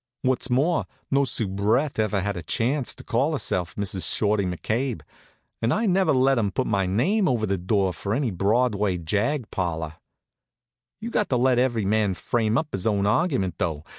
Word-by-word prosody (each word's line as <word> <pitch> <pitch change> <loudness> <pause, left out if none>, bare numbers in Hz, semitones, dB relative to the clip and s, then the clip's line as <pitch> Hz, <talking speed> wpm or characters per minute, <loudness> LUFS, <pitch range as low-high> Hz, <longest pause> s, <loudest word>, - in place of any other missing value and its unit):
What's 130 0 0
more, 145 +7 +1 0.2
no 140 0 +3
soubrette 110 +5 0
ever 105 -2 +1
had 100 +1 -2
a 85 - -4
chance 120 - -1
to - - -11
call 135 +7 0
herself 90 - -2
Mrs. 100 -2 -2
Shorty 105 -2 +1
McCabe, 110 - -2 0.6
and 115 - +1
I 225 - +1
never 190 -1 +3
let 130 -1 +3
'em 105 -3 +1
put 130 +6 -1
my 100 -3 0
name 185 - +2
over 120 -4 +1
the 100 -2 -1
door 95 +1 +1
of 90 +3 -8
any 120 +4 0
Broadway 105 0 +1
jag 105 - -1
parlor. 80 -4 -3 1.0
You 230 +2 -5
got 210 - 0
to 125 - +2
let 125 0 +3
every 120 -5 +1
man 105 -1 +1
frame 115 +1 0
up 155 0 -1
his 95 +2 -2
own 100 -2 +1
argument, 115 - +1
though. 80 -3 -2
110 Hz, 180 wpm, -24 LUFS, 95-130 Hz, 1.0 s, no